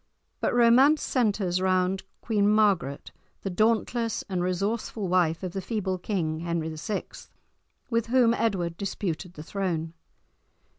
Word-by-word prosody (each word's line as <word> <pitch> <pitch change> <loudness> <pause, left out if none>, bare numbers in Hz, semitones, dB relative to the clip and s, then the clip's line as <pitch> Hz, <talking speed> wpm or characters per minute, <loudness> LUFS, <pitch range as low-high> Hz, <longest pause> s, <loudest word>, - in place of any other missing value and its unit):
But - - 0
romance 250 +6 +5
centres 200 -7 +1
round 185 0 +1 0.2
Queen 205 -3 +2
Margaret, 200 -10 +1 0.3
the 195 - -2
dauntless 225 +3 +1
and 185 -3 -2
resourceful 200 +3 -2
wife 175 -2 +1
of 185 - -3
the 195 - -3
feeble 190 -3 -2
King 165 -5 -2
Henry 165 -1 -2
VI., 155 +7 -3 0.9
with 230 -1 +1
whom 240 -1 +4
Edward 180 -8 -1
disputed 185 -3 -4
the 150 - -8
throne. 165 -3 -3
195 Hz, 130 wpm, -27 LUFS, 175-220 Hz, 0.9 s, romance